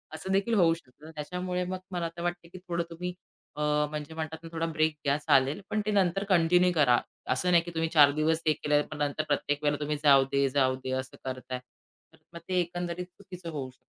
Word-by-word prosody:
असं 160 Hz, +5 st, -5 dB
देखील 195 Hz, +4 st, +1 dB
होऊ 170 Hz, -6 st, +5 dB
शकतं. 155 Hz, 0 st, -12 dB
त्याच्यामुळे 180 Hz, +4 st, -3 dB
मग 185 Hz, +1 st, -4 dB
मला 175 Hz, -2 st, -2 dB
तर 170 Hz, -, -5 dB
वाटत 175 Hz, -1 st, -3 dB
की -, -, -7 dB
थोडं 175 Hz, -2 st, -3 dB
तुम्ही 180 Hz, +2 st, -5 dB, 0.4 s
अ, 150 Hz, -, -5 dB, 0.3 s
म्हणजे 150 Hz, 0 st, -6 dB
म्हणतात 160 Hz, 0 st, -4 dB
ना 165 Hz, -, -8 dB
थोडा 165 Hz, 0 st, -1 dB
ब्रेक 155 Hz, -1 st, +1 dB
घ्या 140 Hz, +1 st, +3 dB
चालेल 140 Hz, +2 st, +2 dB
पण 215 Hz, -, 0 dB
ते 215 Hz, -, 0 dB
नंतर 195 Hz, -1 st, +2 dB
कंटिन्यू 180 Hz, 0 st, +4 dB
करा. 125 Hz, -6 st, +5 dB, 0.3 s
असं 180 Hz, +8 st, 0 dB
नाही 170 Hz, -1 st, +5 dB
की 175 Hz, -, -7 dB
तुम्ही 160 Hz, 0 st, 0 dB
4 145 Hz, -3 st, +7 dB
दिवस 160 Hz, +1 st, +2 dB
हे 155 Hz, -, +5 dB
केलंय 150 Hz, 0 st, +1 dB
पण 155 Hz, -, -5 dB
नंतर 145 Hz, +1 st, -1 dB
प्रत्येक 145 Hz, 0 st, 0 dB
वेळेला 145 Hz, -1 st, +1 dB
तुम्ही 150 Hz, 0 st, -1 dB
जाऊदे-जाऊदे 135 Hz, -2 st, +3 dB
असं 130 Hz, 0 st, -8 dB
करताय. 130 Hz, -1 st, -4 dB, 0.5 s
तर -, -, -20 dB, 0.2 s
मग 170 Hz, -, -7 dB
ते 185 Hz, -, 0 dB
एकंदरीत 175 Hz, 0 st, -3 dB
चुकीचं 180 Hz, -1 st, -10 dB
होऊ 140 Hz, -4 st, -4 dB
शकतं. 130 Hz, -, -19 dB
160 Hz, 205 wpm, -29 LUFS, 145-180 Hz, 0.5 s, 4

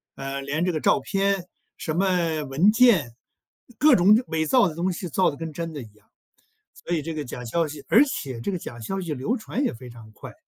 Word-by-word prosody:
呃， 135 Hz, 0 st, -5 dB
连 145 Hz, +5 st, -2 dB
这 180 Hz, -, +1 dB
个 155 Hz, -3 st, -3 dB
照 -, -, +3 dB
片， 195 Hz, -2 st, -1 dB, 0.3 s
什 155 Hz, -, -3 dB
么 175 Hz, -4 st, +1 dB
文 150 Hz, +10 st, +3 dB
件， 215 Hz, -, +4 dB, 0.7 s
各 295 Hz, -1 st, +6 dB
种 195 Hz, +4 st, +6 dB
伪 160 Hz, -1 st, -1 dB
造 245 Hz, -1 st, +4 dB
的 165 Hz, -, -5 dB
东 175 Hz, +3 st, -1 dB
西 180 Hz, +1 st, -5 dB
造 185 Hz, +5 st, +2 dB
的 145 Hz, -, -10 dB
跟 160 Hz, 0 st, -6 dB
真 165 Hz, +2 st, -5 dB
的 145 Hz, -, -6 dB
一 110 Hz, -2 st, -15 dB
样。 105 Hz, -, -27 dB, 0.8 s
所 175 Hz, -, -2 dB
以 160 Hz, -, -1 dB
这 165 Hz, +2 st, -4 dB
个 155 Hz, -1 st, -4 dB
假 125 Hz, -2 st, -8 dB
消 165 Hz, +7 st, 0 dB
息 145 Hz, -1 st, -9 dB
而 235 Hz, -, +6 dB
且 135 Hz, -, -5 dB
这 160 Hz, -, -2 dB
个 185 Hz, -, -2 dB
假 120 Hz, -8 st, -9 dB
消 195 Hz, -, -4 dB
息 170 Hz, -5 st, -3 dB
流 150 Hz, -, -2 dB
传 240 Hz, +4 st, -3 dB
也 -, -, +1 dB
非 125 Hz, +1 st, -11 dB
常 115 Hz, -2 st, -13 dB
快， 110 Hz, -, -11 dB
165 Hz, 250 characters per minute, -24 LUFS, 140-195 Hz, 0.8 s, 各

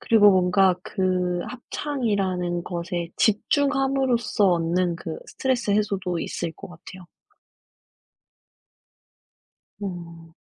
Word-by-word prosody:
그리고 210 Hz, -3 st, +6 dB
뭔가 185 Hz, 0 st, +4 dB
그 180 Hz, -2 st, 0 dB
합창이라는 200 Hz, -10 st, -2 dB
것에 175 Hz, -1 st, -4 dB
집중함으로써 270 Hz, -1 st, +2 dB
얻는 175 Hz, +1 st, +1 dB
그 165 Hz, -1 st, -6 dB
스트레스 255 Hz, -5 st, -1 dB
해소도 200 Hz, -4 st, 0 dB
있을 165 Hz, -, -4 dB
것 -, -, -11 dB
같아요. 180 Hz, +1 st, -12 dB, 2.8 s
아. 170 Hz, -3 st, -7 dB
185 Hz, 205 characters per minute, -24 LUFS, 175-220 Hz, 2.8 s, 그리고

